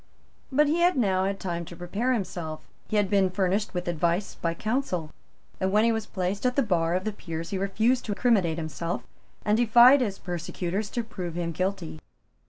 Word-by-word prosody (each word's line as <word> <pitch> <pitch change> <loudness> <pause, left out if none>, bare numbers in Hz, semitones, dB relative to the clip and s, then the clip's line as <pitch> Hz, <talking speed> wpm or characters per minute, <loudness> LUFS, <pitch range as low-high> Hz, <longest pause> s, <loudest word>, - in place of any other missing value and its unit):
But 295 +3 +4
he 310 +4 +1
had 350 -2 +3
now 190 -5 +2
had 195 0 -2
time 170 -2 -3
to 170 - -10
prepare 200 +9 -1
himself; 175 -9 -3 0.2
he - - -3
had 205 -1 +3
been 195 -1 +3
furnished 190 +2 0
with 180 0 -3
advice 170 +3 0
by 165 0 -2
counsel; 215 - -2 0.5
and, 190 0 0
when 210 +2 +4
he 230 - +4
was 220 -2 -2
placed 190 +1 -2
at 250 0 +1
the 275 - +3
bar 170 -5 +1
of 185 - -1
the 215 - -1
Peers, 165 -4 -6
he 195 - -1
refused 220 +6 +1
to 205 - -2
criminate 195 -10 +2
himself 165 +1 -3 0.4
and 210 +1 +3
defied 240 +4 +7
his 200 -5 -1
persecutors 180 +3 -3
to 235 - -2
prove 180 -6 -6
him 170 -1 -2
guilty. 185 - -3
195 Hz, 195 wpm, -27 LUFS, 175-220 Hz, 0.5 s, defied